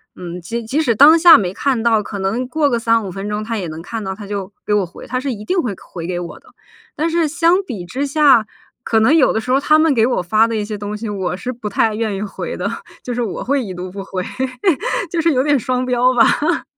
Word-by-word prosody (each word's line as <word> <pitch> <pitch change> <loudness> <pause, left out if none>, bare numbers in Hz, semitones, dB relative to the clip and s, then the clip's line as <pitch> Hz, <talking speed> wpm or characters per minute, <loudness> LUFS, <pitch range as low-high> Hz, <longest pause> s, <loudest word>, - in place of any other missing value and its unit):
嗯， 175 0 -7
即 230 +7 -4
即 265 +8 -1
使 240 -7 +1
当 300 +8 +7
下 340 0 +9
没 185 -3 -2
看 255 0 -1
到， 225 -2 +3
可 205 - -7
能 220 +7 -2
过 290 +3 +1
个 240 -3 0
3 230 -1 +1
5 190 - -5
分 195 +3 -6
钟 210 +1 -3
他 225 +1 -3
也 185 -4 -4
能 160 0 -7
看 225 +6 -6
到， 190 -2 -4
他 205 +1 -9
就 200 -1 -5
给 210 - 0
我 205 -2 +2
回， 170 - -12
他 255 +1 -2
是 265 0 -3
一 210 -2 -8
定 370 - -1
会 225 -9 -3 0.2
回 170 -2 -6
给 180 -1 -3
我 170 - -8
的。 - - -26 0.5
但 320 +3 0
是 330 -2 +1
相 340 +5 +2
比 210 - -6
之 260 +11 -3
下， 280 -5 +4 0.4
可 225 - +2
能 225 +8 +4
有 315 - +4
的 - - 0
时 250 +3 -4
候 260 - +4
他 305 +2 +3
们 315 -2 +3
给 225 -3 +3
我 250 - 0
发 215 +6 +3
的 230 - -3
一 210 - -2
些 210 0 -5
东 205 +1 -5
西， 225 +1 -6
我 190 -3 -3
是 250 +5 -5
不 230 -3 -6
太 215 +2 +1
愿 220 -1 -2
意 195 - -4
回 210 -2 -5
的， - - -2 0.3
就 245 - -5
是 245 - -2
我 220 -6 -3
会 275 +1 0
已 195 -4 -6
读 180 +1 -6
不 195 +1 -7
回， 190 -1 -4 0.9
就 335 0 -1
是 330 +1 +3
有 255 -3 +2
点 290 +1 +2
双 255 +1 -1
标 250 0 +2
吧。 295 +7 +2
230 Hz, 285 characters per minute, -18 LUFS, 200-270 Hz, 0.9 s, 下